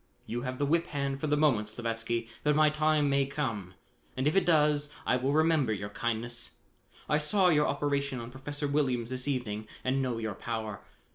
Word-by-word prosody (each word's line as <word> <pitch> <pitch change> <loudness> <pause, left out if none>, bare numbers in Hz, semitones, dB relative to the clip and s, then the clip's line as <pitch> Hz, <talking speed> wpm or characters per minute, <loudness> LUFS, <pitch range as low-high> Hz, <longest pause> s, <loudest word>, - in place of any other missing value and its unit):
"You 120 +1 -3
have 125 0 -4
the 145 - +1
whip 170 +4 +2
hand 140 -1 -2
for 155 - -1
the 150 0 +2
moment, 125 -9 +2
Slavatsky, 115 0 -2 0.2
but 150 0 +3
my 155 0 +5
time 155 -1 +2
may 140 -1 +2
come 115 -11 -3 0.4
and 130 - 0
if 150 - +2
it 195 - +3
does, 150 -2 +3
I - - +3
will 130 +2 0
remember 155 -5 +3
your 100 0 -4
kindness. 120 +2 -3 0.5
I 150 - +2
saw 180 +5 +3
your 150 -3 +4
operation 140 -2 -1
on 115 +1 -7
Professor 145 +3 -4
Williams 130 -5 0
this 130 +1 -3
evening 110 -6 -2 0.2
and 130 +1 +1
know 125 -3 -1
your 110 -2 -3
power. 110 -1 -4
135 Hz, 195 wpm, -30 LUFS, 115-150 Hz, 0.5 s, my